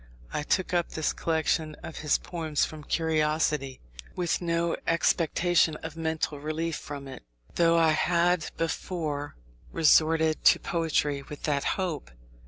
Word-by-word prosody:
I - - -1
took 185 +5 0
up 175 -1 +1
the 155 - -1
collection 160 -1 0
of 160 - -8
his 150 -1 +2
poems 160 -4 -1
from 155 -1 -9
curiosity, 155 -4 0 0.3
with 175 -1 0
no 170 0 0
expectation 165 0 +2
of 160 -1 -6
mental 160 -2 -2
relief 155 +2 -2
from 140 -2 -7
it, 135 - -9 0.3
though 170 0 +3
I 165 -1 +5
had 170 +1 +2
before 160 -3 -3 0.4
resorted 160 0 +3
to - - +6
poetry 155 -5 0
with 145 +1 -10
that 145 -2 0
hope. 175 - -3
160 Hz, 135 wpm, -27 LUFS, 150-170 Hz, 0.4 s, to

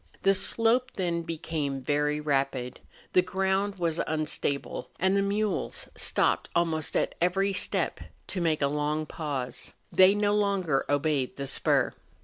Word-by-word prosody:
The 195 - +5
slope 235 +6 +3
then 170 -3 -1
became 155 -4 -3
very 150 +2 0
rapid, 135 -4 -1 0.3
the 180 - +6
ground 190 +2 0
was 170 -3 -1
unstable, 155 -2 -2
and 190 +2 +2
the 200 - +3
mules 205 +1 -1
stopped - - +1
almost 165 -2 0
at - - 0
every 195 +3 +2
step - - 0 0.3
to 185 - -4
make 160 -3 +1
a - - +4
long 150 +2 -1
pause; 140 -6 -5 0.2
they 185 +3 +6
no 205 0 +2
longer 195 -9 +1
obeyed 145 -3 0
the 140 - -4
spur. - - +2
165 Hz, 140 wpm, -28 LUFS, 145-195 Hz, 0.3 s, the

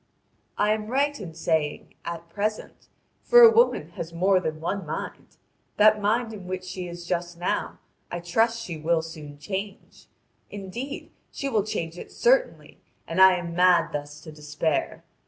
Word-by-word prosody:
I 210 +1 +2
am 215 0 -1
right 280 +3 0
in 170 -6 -8
saying 160 -2 -1
'at 170 0 -6
present', 210 +5 -4 0.3
for 485 0 +7
a 460 - +10
woman 465 +2 +3
has 165 0 -7
more 185 +3 +3
than 155 -3 -4
one 195 +4 -3
mind. 155 - -7 0.4
That 215 0 +5
mind 225 +2 0
in 195 -4 -9
which 185 0 -4
she 185 0 -6
is 175 0 -8
just 175 -1 -3
now 175 - -2 0.3
I 175 - -4
trust 225 +7 +1
she 170 -6 -6
will 160 +1 +1
soon 150 -3 -9
change; 195 +6 -7 0.4
indeed, 215 +8 -7 0.2
she 275 - -4
will 220 -5 +2
change 175 -5 -4
it - - -10
certainly, - - +1 0.3
and 165 +3 +1
I 190 -1 +8
am 175 -1 -5
mad 180 -1 +4
thus 145 0 -6
to 155 - -10
despair. 150 0 -2
180 Hz, 165 wpm, -25 LUFS, 165-215 Hz, 0.4 s, a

